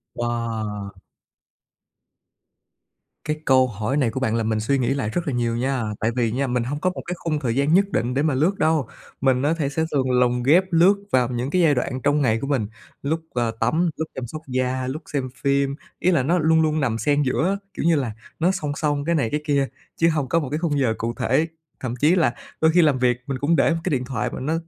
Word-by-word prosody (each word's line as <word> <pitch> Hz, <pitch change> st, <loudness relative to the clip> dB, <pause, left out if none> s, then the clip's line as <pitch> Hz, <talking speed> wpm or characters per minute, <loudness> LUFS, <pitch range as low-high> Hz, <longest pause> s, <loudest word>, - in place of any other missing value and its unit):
Wow! 110 Hz, -4 st, -3 dB, 2.3 s
Cái 155 Hz, 0 st, -2 dB
câu 130 Hz, -1 st, +5 dB
hỏi 110 Hz, +4 st, -2 dB
này 130 Hz, -5 st, +2 dB
của 130 Hz, -, -3 dB
bạn 115 Hz, -4 st, 0 dB
làm 115 Hz, -1 st, 0 dB
mình 110 Hz, -1 st, 0 dB
suy 125 Hz, +6 st, +1 dB
nghĩ 125 Hz, -2 st, 0 dB
lại 135 Hz, -6 st, -2 dB
rất 175 Hz, +8 st, -3 dB
là 145 Hz, -, -1 dB
nhiều 120 Hz, -1 st, 0 dB
nha. 130 Hz, +1 st, -1 dB, 0.2 s
Tại 110 Hz, +2 st, 0 dB
vì 120 Hz, -3 st, +1 dB
nha, 135 Hz, +4 st, -1 dB
mình 125 Hz, -1 st, 0 dB
hông 145 Hz, +5 st, -3 dB
có 185 Hz, -, +1 dB
một 185 Hz, -, -6 dB
cái 180 Hz, -, -3 dB
khung 155 Hz, -3 st, -2 dB
thời 120 Hz, -5 st, -1 dB
gian 140 Hz, +3 st, +2 dB
nhất 195 Hz, +3 st, +5 dB
định 120 Hz, -1 st, 0 dB
để 135 Hz, -, +1 dB
mà 155 Hz, -2 st, +2 dB
lướt 165 Hz, +9 st, +1 dB
đâu, 155 Hz, -5 st, +2 dB, 0.3 s
mình 130 Hz, -1 st, +3 dB
á 145 Hz, +3 st, +2 dB
thể 145 Hz, -4 st, 0 dB
sẽ 150 Hz, +3 st, -1 dB
thường 130 Hz, -3 st, +1 dB
lồng 125 Hz, -1 st, +2 dB
ghép 160 Hz, +9 st, +5 dB
lướt 175 Hz, +4 st, +5 dB, 0.2 s
vào 125 Hz, -1 st, +3 dB
những 125 Hz, +1 st, -2 dB
cái 180 Hz, +4 st, +2 dB
giai 155 Hz, -4 st, +4 dB
đoạn 130 Hz, +1 st, -2 dB
trong 145 Hz, +1 st, +2 dB
ngày 115 Hz, -4 st, +2 dB
của 140 Hz, -, -3 dB
mình, 130 Hz, -7 st, 0 dB, 0.4 s
lúc, 155 Hz, +4 st, 0 dB
ờ, 120 Hz, -2 st, 0 dB
tắm, 160 Hz, +10 st, +2 dB
lúc 160 Hz, -, -2 dB
chăm 125 Hz, -2 st, -5 dB
sóc 155 Hz, +5 st, -7 dB
da, 130 Hz, 0 st, -1 dB
lúc 140 Hz, +5 st, -4 dB
xem 135 Hz, -3 st, -1 dB
phim. 140 Hz, 0 st, 0 dB, 0.2 s
Ý 185 Hz, -, +2 dB
là 160 Hz, -7 st, +2 dB
nó 170 Hz, +7 st, +2 dB
luôn 160 Hz, 0 st, +4 dB
luôn 155 Hz, 0 st, +1 dB
nằm 120 Hz, -6 st, 0 dB
xen 145 Hz, +4 st, +1 dB
giữa 140 Hz, +3 st, +1 dB
á, 195 Hz, -, +1 dB, 0.2 s
kiểu -, -, -3 dB
như 170 Hz, -1 st, +4 dB
là, 130 Hz, -6 st, -1 dB, 0.3 s
nó 175 Hz, +3 st, +3 dB
song 160 Hz, -7 st, -3 dB
song 145 Hz, -2 st, -1 dB
cái 170 Hz, +1 st, +1 dB
này 135 Hz, -8 st, +1 dB
cái 150 Hz, +4 st, -2 dB
kia, 140 Hz, -2 st, +1 dB, 0.3 s
chứ 165 Hz, -, +4 dB
hông 150 Hz, -5 st, -1 dB
có 165 Hz, -, +3 dB
một 145 Hz, -5 st, -4 dB
cái 150 Hz, -, -1 dB
khung 155 Hz, -4 st, 0 dB
giờ 125 Hz, -5 st, +2 dB
cụ 115 Hz, +1 st, -2 dB
thể. 145 Hz, +8 st, +1 dB, 0.3 s
Thậm 125 Hz, -2 st, -4 dB
chí 150 Hz, +8 st, +3 dB
là 160 Hz, -9 st, +2 dB, 0.3 s
đôi 160 Hz, 0 st, +5 dB
khi 175 Hz, +2 st, +5 dB
làm 150 Hz, -5 st, +3 dB
việc, 125 Hz, -1 st, +2 dB
mình 135 Hz, -2 st, -2 dB
cũng 155 Hz, +4 st, +2 dB
để -, -, +3 dB
một 165 Hz, -, -2 dB
cái 185 Hz, -, -1 dB
điện 130 Hz, -5 st, 0 dB
thoại, 125 Hz, -5 st, -2 dB
mà -, -, -5 dB
nó 150 Hz, +5 st, -1 dB
140 Hz, 255 wpm, -23 LUFS, 125-155 Hz, 2.3 s, câu